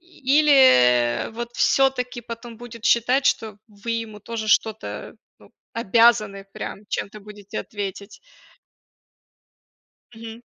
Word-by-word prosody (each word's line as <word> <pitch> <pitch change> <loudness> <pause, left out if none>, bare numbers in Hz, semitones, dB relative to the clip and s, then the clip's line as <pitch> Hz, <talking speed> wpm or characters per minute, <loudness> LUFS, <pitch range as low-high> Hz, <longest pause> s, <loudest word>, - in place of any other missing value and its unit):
Или 265 - +3
вот 235 +1 -6
всё-таки 255 -2 +1
потом 230 0 -9
будет 230 -1 -11
считать, 250 +4 +3
что 215 -2 0
вы 205 +2 -8
ему 225 -2 -5
тоже 220 0 -5
что-то, 220 +1 -1 0.2
ну, - - -20 0.2
обязаны 215 -2 +2
прям - - -6
чем-то 215 +1 -4
будете 210 0 -9
ответить. 200 0 -7 2.0
Мгм. 225 +1 -10
225 Hz, 100 wpm, -22 LUFS, 210-240 Hz, 2.0 s, Или